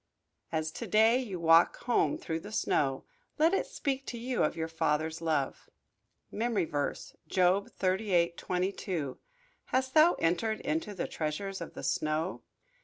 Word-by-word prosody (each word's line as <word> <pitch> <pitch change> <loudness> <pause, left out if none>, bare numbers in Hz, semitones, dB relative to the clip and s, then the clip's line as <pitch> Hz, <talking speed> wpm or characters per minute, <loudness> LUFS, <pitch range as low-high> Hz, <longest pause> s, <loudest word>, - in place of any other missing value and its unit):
As 160 -1 -1
to - - -6
day 225 +3 +5
you 205 -9 -4
walk 165 +1 +5
home 245 +5 +2
through 165 - -3
the 205 +5 -10
snow 135 -10 0 0.3
let 325 +3 +4
it - - +1
speak 275 -1 -2
to 240 - -4
you 245 +2 -2
of 150 - 0
your 160 0 -2
Father's 160 0 -1
love. 155 -5 -1 0.6
MEMORY 220 -4 0
VERSE, 145 -3 -3
Job 185 +2 +2
38: 185 -3 +1
22 180 -6 -2 0.5
"Hast 260 0 -1
thou 315 +3 +6
entered 180 +7 0
into 295 -8 -2
the 185 - -2
treasures 175 +5 -3
of 170 - -7
the - - -7
snow?" 155 +4 -1
185 Hz, 150 wpm, -30 LUFS, 160-230 Hz, 0.6 s, thou